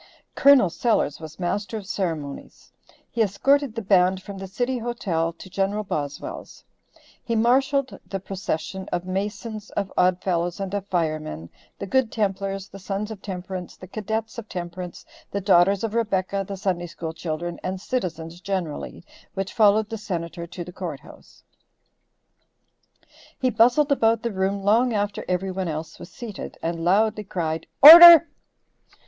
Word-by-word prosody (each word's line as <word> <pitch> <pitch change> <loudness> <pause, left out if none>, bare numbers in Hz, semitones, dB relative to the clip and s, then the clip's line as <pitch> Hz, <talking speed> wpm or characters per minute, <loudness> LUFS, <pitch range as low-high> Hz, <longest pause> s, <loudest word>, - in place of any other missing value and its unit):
Col. 275 -7 +6
Sellers 170 - 0
was 160 +1 -10
master 205 +5 -2
of 205 - -8
ceremonies. 165 -8 -5 0.4
He 235 - -1
escorted 270 +5 +2
the 230 - -4
band 185 -1 +3
from 200 -1 -8
the 195 - -6
city 245 +6 -2
hotel 190 -9 -2
to 190 - -13
Gen. 195 +2 -1
Boswell's; 145 -7 -6 0.6
he 230 - -2
marshalled 265 +4 +1
the 195 - -4
procession 190 -1 -5
of 175 0 -2
Masons, 210 +3 -4
of 200 -1 -2
Odd 180 0 +3
Fellows, 175 0 -1
and 195 -1 -4
of 200 -1 -3
Firemen, 155 - -3 0.3
the - - -5
Good 240 +2 +1
Templars, 195 -2 -2
the 195 - -12
Sons 200 +3 -4
of 210 -3 -8
Temperance, 185 -2 -7
the - - -11
Cadets 220 +3 -4
of 220 - -10
Temperance, 175 0 -7 0.2
the 200 - -3
Daughters 195 +1 +3
of 225 -2 -2
Rebecca, 200 -4 -1
the 195 - -6
Sunday 185 -3 -2
School 165 -1 -6
children, 170 +1 -5
and 185 0 -4
citizens 175 -7 -4
generally, 180 -3 -4 0.3
which 195 0 -4
followed 215 -1 +4
the 225 - -4
Senator 170 -4 -5
to 175 0 -7
the 180 +1 -11
court 165 -7 -6
house; - - -17 2.0
he 255 -1 +1
bustled 245 +6 +3
about 230 -4 +2
the 235 - -1
room 195 +1 -1
long 230 +4 +3
after 205 -1 -2
every 185 +1 -1
one 185 -1 -3
else 160 +1 -6
was - - -10
seated, 225 -5 -8
and 165 0 -3
loudly 210 +4 +2
cried 165 -4 -3 0.2
"Order!" 335 +2 +12
195 Hz, 155 wpm, -24 LUFS, 175-220 Hz, 2.0 s, Order